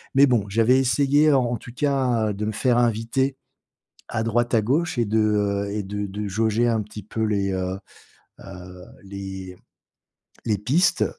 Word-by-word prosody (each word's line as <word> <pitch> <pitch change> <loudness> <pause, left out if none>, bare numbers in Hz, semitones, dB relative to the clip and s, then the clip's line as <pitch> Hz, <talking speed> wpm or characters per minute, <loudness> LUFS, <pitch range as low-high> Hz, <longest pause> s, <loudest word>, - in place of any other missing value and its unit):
mais 140 +1 +7
bon 115 -5 +2
j'avais 115 +5 +3
essayé, 140 +4 +3
en 130 -2 +3
en 120 0 -2
tout 120 - -12
cas, 125 -7 +1
de 105 +2 -4
me 110 - -1
faire 120 +2 +1
inviter 120 +3 0 0.7
à 110 - -2
droite, 120 +1 0
à 110 - +3
gauche 150 +8 0
et 120 - +3
de, 110 +2 0
heu, 100 -1 0
et 105 -1 -2
de 105 +1 -4
de 100 +1 -5
jauger 110 +3 +1
un 110 -2 +1
petit 105 0 -10
peu 110 +1 -4
les, 100 -2 0
heu, 95 0 -3 0.6
heu, 90 -1 -11 0.2
les 95 -2 -8 0.9
les 105 -3 +1
pistes, 170 - +2
110 Hz, 170 wpm, -23 LUFS, 100-125 Hz, 0.9 s, mais